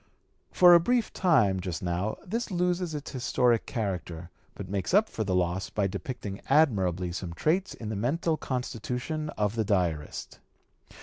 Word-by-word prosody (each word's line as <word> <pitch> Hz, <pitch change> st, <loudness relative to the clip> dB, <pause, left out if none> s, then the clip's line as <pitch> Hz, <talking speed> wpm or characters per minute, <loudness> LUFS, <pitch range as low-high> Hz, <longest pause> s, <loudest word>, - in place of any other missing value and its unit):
For 180 Hz, -1 st, +7 dB
a 170 Hz, -, +9 dB
brief 240 Hz, +7 st, 0 dB
time 120 Hz, -, +3 dB
just 90 Hz, -1 st, -4 dB
now 90 Hz, +4 st, -1 dB
this 230 Hz, +6 st, -3 dB
loses 180 Hz, -2 st, 0 dB
its 145 Hz, -, -6 dB
historic 125 Hz, -3 st, +1 dB
character, 90 Hz, -6 st, -4 dB, 0.2 s
but 100 Hz, -, -7 dB
makes 100 Hz, -, -1 dB
up 215 Hz, +2 st, +5 dB
for 110 Hz, -, -3 dB
the 95 Hz, -3 st, -1 dB
loss 90 Hz, +1 st, 0 dB
by 105 Hz, -, 0 dB
depicting 100 Hz, 0 st, -5 dB
admirably 95 Hz, -, +2 dB
some 85 Hz, -1 st, -5 dB
traits 180 Hz, -, 0 dB
in 110 Hz, -, -7 dB
the 110 Hz, -, -3 dB
mental 155 Hz, +10 st, 0 dB
constitution 130 Hz, +3 st, -3 dB
of 105 Hz, -1 st, +1 dB
the 115 Hz, -1 st, 0 dB
diarist. 90 Hz, -7 st, -2 dB
110 Hz, 160 wpm, -28 LUFS, 95-155 Hz, 0.2 s, a